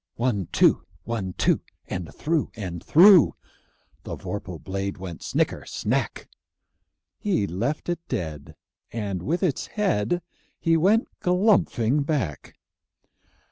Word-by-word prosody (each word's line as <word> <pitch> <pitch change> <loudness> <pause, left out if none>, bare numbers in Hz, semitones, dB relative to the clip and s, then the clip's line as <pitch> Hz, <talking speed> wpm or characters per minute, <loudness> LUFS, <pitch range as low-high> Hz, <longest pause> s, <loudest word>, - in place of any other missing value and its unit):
One, 115 -7 0
two! - - +4 0.2
One, 105 -6 -3
two! - - +2 0.3
And 90 -3 -5
through 160 -1 -1
and 90 -5 -5
through 180 0 +7 0.7
The - - -6
vorpal 100 -4 -6
blade 95 +4 -4
went 90 -3 -7
snicker - - 0
snack! - - -2 0.9
He 190 - +1
left 115 - -2
it 175 -1 -1
dead, 80 -4 -4 0.4
and 100 -5 -3
with 165 - -1
its 160 -8 0
head 175 - 0 0.4
He 165 0 +3
went 200 +8 +3
galumphing 180 - +2
back. 135 - -3
115 Hz, 115 wpm, -25 LUFS, -, 0.9 s, through